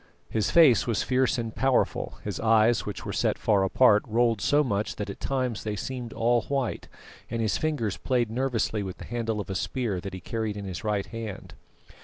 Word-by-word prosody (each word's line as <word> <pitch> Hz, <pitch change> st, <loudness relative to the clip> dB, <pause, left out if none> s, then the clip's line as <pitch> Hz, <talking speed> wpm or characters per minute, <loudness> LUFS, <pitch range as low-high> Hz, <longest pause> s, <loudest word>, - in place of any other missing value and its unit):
His 110 Hz, 0 st, 0 dB
face 145 Hz, -6 st, +6 dB
was 115 Hz, -3 st, +1 dB
fierce 130 Hz, 0 st, +1 dB
and 115 Hz, -2 st, -3 dB
powerful; 130 Hz, +2 st, +1 dB
his -, -, -4 dB
eyes, 115 Hz, +1 st, +3 dB
which 105 Hz, -, -5 dB
were -, -, -4 dB
set -, -, +1 dB
far 100 Hz, -3 st, +2 dB
apart, 105 Hz, +2 st, +5 dB
rolled 115 Hz, -1 st, +2 dB
so 145 Hz, +1 st, +3 dB
much 105 Hz, -5 st, -1 dB
that 100 Hz, -1 st, -4 dB
at -, -, -11 dB
times 130 Hz, -4 st, -2 dB
they 105 Hz, -1 st, -2 dB
seemed 120 Hz, +4 st, -5 dB
all 120 Hz, +1 st, +2 dB
white; 135 Hz, -5 st, -2 dB, 0.4 s
and 115 Hz, -, -3 dB
his 110 Hz, -5 st, 0 dB
fingers 145 Hz, -10 st, -1 dB
played 120 Hz, -4 st, 0 dB
nervously 115 Hz, -3 st, 0 dB
with 95 Hz, -2 st, -5 dB
the -, -, -9 dB
handle 115 Hz, -2 st, -2 dB
of 105 Hz, -, -4 dB
a -, -, -1 dB
spear 100 Hz, 0 st, -2 dB
that 95 Hz, 0 st, -6 dB
he -, -, -6 dB
carried 110 Hz, +3 st, -3 dB
in 100 Hz, -, -6 dB
his 95 Hz, +1 st, -6 dB
right 105 Hz, -2 st, 0 dB
hand. 115 Hz, -4 st, -7 dB
115 Hz, 205 wpm, -27 LUFS, 105-125 Hz, 0.4 s, face